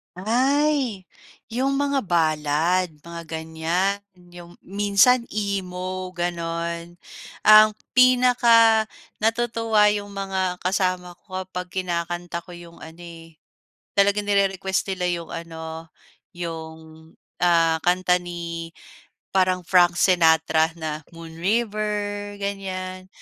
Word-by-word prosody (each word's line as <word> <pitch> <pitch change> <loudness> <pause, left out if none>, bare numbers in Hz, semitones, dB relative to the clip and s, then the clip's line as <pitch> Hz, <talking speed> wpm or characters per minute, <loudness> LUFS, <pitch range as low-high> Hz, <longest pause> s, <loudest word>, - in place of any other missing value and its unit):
Ay 255 - 0 0.4
yung 260 +4 0
mga 280 -3 0
balad 160 +1 +1 0.2
mga 170 +1 -8
ganyan. 160 +4 -1 0.2
Yung 175 -1 -14
minsan 205 +5 +3
emo, 185 -2 -3
ganon? 170 0 -4 0.4
Ang 215 0 +7 0.2
pinakanatutuwa 230 -2 +3
yung 205 -1 -3
mga 190 -2 -2
kasama 185 -1 -1
ko 185 -2 -5
kapag 180 -1 -7
kinakanta 175 0 -4
ko 180 - -11
yung 170 -1 -12
ano, 160 +2 -12
eh, 165 -2 -12 0.6
talagang 200 +1 +2
nire-request 195 -1 0
nila 180 -1 -2
yung 170 -1 -8
ano, 160 -1 -7 0.5
yung, 165 -2 -6 0.6
ah, 165 -2 +3
kanta 180 0 +2
ni 170 -1 -6 0.6
parang 185 -1 +2
Frank 175 -2 +4
Sinatra 160 -2 +3
na 155 -1 -4
Moon 165 -1 -11
River, 205 +1 -2
ganyan. 185 -2 -5
185 Hz, 100 wpm, -23 LUFS, 170-205 Hz, 0.6 s, Ang